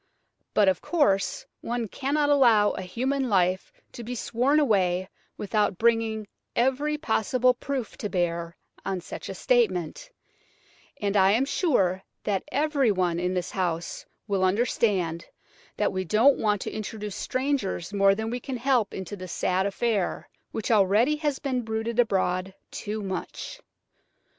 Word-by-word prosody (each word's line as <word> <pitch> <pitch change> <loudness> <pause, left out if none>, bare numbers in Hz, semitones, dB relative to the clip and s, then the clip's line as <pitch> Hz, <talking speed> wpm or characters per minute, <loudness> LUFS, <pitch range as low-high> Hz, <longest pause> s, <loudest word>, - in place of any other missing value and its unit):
But, 210 -2 +5
of 190 -1 +2
course, 200 - +1 0.2
one 235 -1 -2
cannot 290 +6 0
allow 230 -7 +5
a - - -5
human 255 +8 -1
life 185 -2 +1 0.2
to 240 - -8
be 245 +2 -5
sworn 250 +6 +1
away 190 -9 +2 0.3
without 210 -2 0
bringing 225 -1 +1 0.3
every 270 +5 +1
possible 250 -1 +2
proof 255 -1 -4
to 210 - -3
bear 170 -2 -2 0.3
on 195 -1 -2
such - - -8
a - - -5
statement, 470 - 0 0.9
and 205 -1 -1
I 195 0 +5
am 245 +5 +2
sure 195 - +1 0.2
that 195 -2 -1
everyone 235 - +1
in 180 +1 -1
this 180 -1 -2
house 175 -3 -2 0.2
will 195 -3 0
understand 185 -4 +1 0.5
that - - +1
we 185 0 -1
don't 225 - +4
want 210 -3 +1
to - - -4
introduce 210 -1 -5
strangers 255 -9 -2
more 195 -1 +4
than 220 +2 -3
we 245 - -2
can 260 +1 -5
help 245 -4 +1
into 190 +1 -5
this 185 -2 -8
sad 190 +2 +1
affair, 205 -1 -1 0.2
which 220 +1 -3
already 215 +8 +4
has 295 -3 -1
been 260 -3 -2
bruited 225 +1 -3
abroad 190 -4 +1 0.2
too 210 0 -4
much." 195 - -5
215 Hz, 145 wpm, -26 LUFS, 190-255 Hz, 0.9 s, But